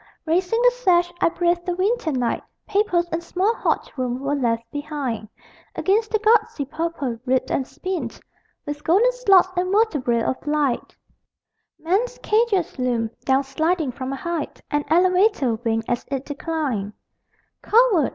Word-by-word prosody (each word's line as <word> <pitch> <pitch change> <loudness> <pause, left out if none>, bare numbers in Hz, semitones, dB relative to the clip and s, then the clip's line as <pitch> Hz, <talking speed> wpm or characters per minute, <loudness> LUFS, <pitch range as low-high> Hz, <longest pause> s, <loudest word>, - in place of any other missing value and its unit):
_ - - -26 0.2
Raising 360 +7 +1
the - - +6
sash, 350 -8 +2
I - - +4
breathed 345 0 0
the 355 -1 -2
winter 390 -1 0
night: 250 -4 -1 0.3
Papers 390 -4 +1
and 330 +1 -2
small 375 +6 +1
hot - - -1
room 250 -2 -2
were 280 +1 -2
left 235 -5 0
behind. 285 -7 -4 0.5
Against 430 +3 +1
the 440 - +2
gusty 430 -8 +2
purple, 300 -5 -3
ribbed 260 0 0
and 265 - 0
spined 370 -2 -5 0.5
With 290 0 -5
golden 405 +11 +4
slots 395 -8 +4
and 365 +1 0
vertebræ 295 - +2
of 260 - -3
light 295 -5 0 0.8
Men's 410 +10 0
cages 425 - +1
loomed. 235 -3 0
Down 265 +1 +3
sliding 315 +2 0
from 260 +1 -5
a - - -2
height 335 +1 -4
An 295 0 +1
elevator 360 - +3
winked 225 -1 -1
as 240 +1 -1
it 275 -1 -3
declined. 280 -9 -3 0.7
Coward! 430 - +4
325 Hz, 150 wpm, -22 LUFS, 265-380 Hz, 0.8 s, the